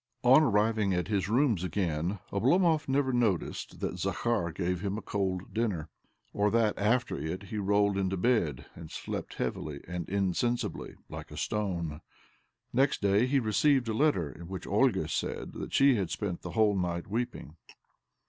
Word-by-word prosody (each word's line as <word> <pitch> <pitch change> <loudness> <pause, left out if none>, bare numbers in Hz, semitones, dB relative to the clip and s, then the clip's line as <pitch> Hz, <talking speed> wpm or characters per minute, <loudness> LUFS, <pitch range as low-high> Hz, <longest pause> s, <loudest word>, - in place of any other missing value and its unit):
Ill 125 - +6
On 155 - +8
arriving 105 -5 +2
at 90 +2 -2
his 100 -2 0
rooms 115 - +2
again, 90 -1 -1 0.2
Oblomov 155 - +3
never 135 -1 +1
noticed 110 -8 -1
that 90 - -3
Zakhar 100 0 0
gave 90 +1 -2
him 100 0 -2
a - - -4
cold 95 -2 -2
dinner, 100 -9 -1 0.4
or 105 0 +2
that, 110 -1 +2
after 115 - +1
it, 80 +6 -4
he 105 +2 -5
rolled 100 0 +2
into 95 0 0
bed 90 - +1
and 80 -2 -10
slept - - -5
heavily 75 -2 -4
and 90 -1 -5
insensibly, 100 +5 -1
like - - -8
a - - -10
stone. 85 -7 -2 0.7
Next 135 +3 +2
day 100 +4 +3
he 135 +1 +3
received 125 +3 +2
a - - 0
letter 110 - +2
in 85 +5 -11
which 95 -1 -6
Olga - - +2
said - - -3
that - - -6
she 135 -3 +5
had 95 -5 -1
spent 100 -5 -3
the - - -7
whole 110 -2 +3
night 85 -2 -1
weeping 115 -7 -4
100 Hz, 165 wpm, -30 LUFS, 90-120 Hz, 0.7 s, On